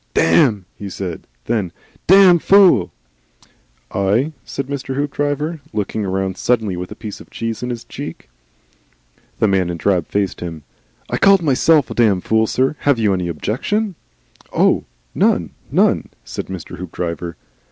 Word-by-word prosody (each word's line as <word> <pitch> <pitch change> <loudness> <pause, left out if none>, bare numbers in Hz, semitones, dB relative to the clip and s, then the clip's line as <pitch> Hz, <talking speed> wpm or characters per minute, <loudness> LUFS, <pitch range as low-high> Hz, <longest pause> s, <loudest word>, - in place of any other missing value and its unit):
"Damn!" 95 +4 +3 0.2
said 90 -3 -5
he. - - -31 0.3
Then, 100 -7 -1 0.4
"Damned 185 -2 +7
Fool!" 185 - +5 1.0
"Eigh?" 105 +10 +1
said 140 - -4
Mr. 135 -1 -4
Hoopdriver, 145 +3 -1
looking 105 0 -2
round 95 0 -2
suddenly 110 -6 0
with 90 +1 -5
a - - -7
piece 105 -3 -8
of - - -15
cheese 115 -1 -4
in 125 - -3
his 120 -1 -4
cheek. - - -8 1.1
The 110 - +2
man 95 -3 +1
in 85 - -3
drab 90 -1 +1
faced 100 -2 -1
him. 80 -3 -6 0.5
"I - - +1
called 195 -2 +5
myself 145 -1 +3
a - - -2
Damned 105 -6 +2
Fool, 110 0 +2
sir. 130 +6 0
Have 140 -3 +2
you 105 -3 +2
any 90 -2 -1
objections?" 140 - -2 0.6
"Oh! - - +2 0.3
None. - - +2 0.2
None," - - +2 0.2
said - - -6
Mr. 95 -3 -7
Hoopdriver. 85 -2 -4
110 Hz, 150 wpm, -19 LUFS, 95-140 Hz, 1.1 s, Damned